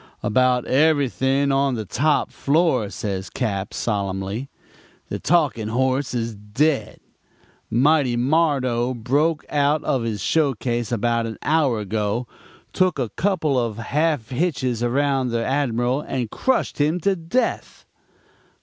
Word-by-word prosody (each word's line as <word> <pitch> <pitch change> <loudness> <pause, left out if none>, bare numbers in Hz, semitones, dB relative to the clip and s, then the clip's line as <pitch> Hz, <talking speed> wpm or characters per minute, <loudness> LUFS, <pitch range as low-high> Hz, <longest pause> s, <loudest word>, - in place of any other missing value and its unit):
"'About 125 +3 +2
everything 140 -1 +2
on 135 -1 +2
the 110 -2 -4
top 150 - +1
floor,' 140 - +1
says 95 -2 -4
Cap., 100 -2 -3
solemnly. 100 +3 -3 0.6
'The - - -3
Talking 145 -11 +1
Horse 130 +3 0
is 115 -1 -2
dead. 110 +9 -1 0.7
Mighty 130 +1 +3
Mardo 130 -3 +1
broke 145 +7 0
out 145 +1 +1
of 130 - 0
his 115 -3 -3
showcase 120 - 0
about 115 0 0
an 110 - -6
hour 145 -6 +2
ago, 105 +3 -2 0.5
took 185 -4 +2
a 125 -5 -1
couple 160 - 0
of 115 -3 -2
half 145 +1 -1
hitches 130 -5 -1
around 135 +2 +1
the 115 -1 -1
Admiral 130 -1 0
and 125 -6 -4
crushed 260 -10 0
him 155 +4 +2
to 195 +3 +2
death.' 170 +9 -2
130 Hz, 125 wpm, -22 LUFS, 115-150 Hz, 0.7 s, Mighty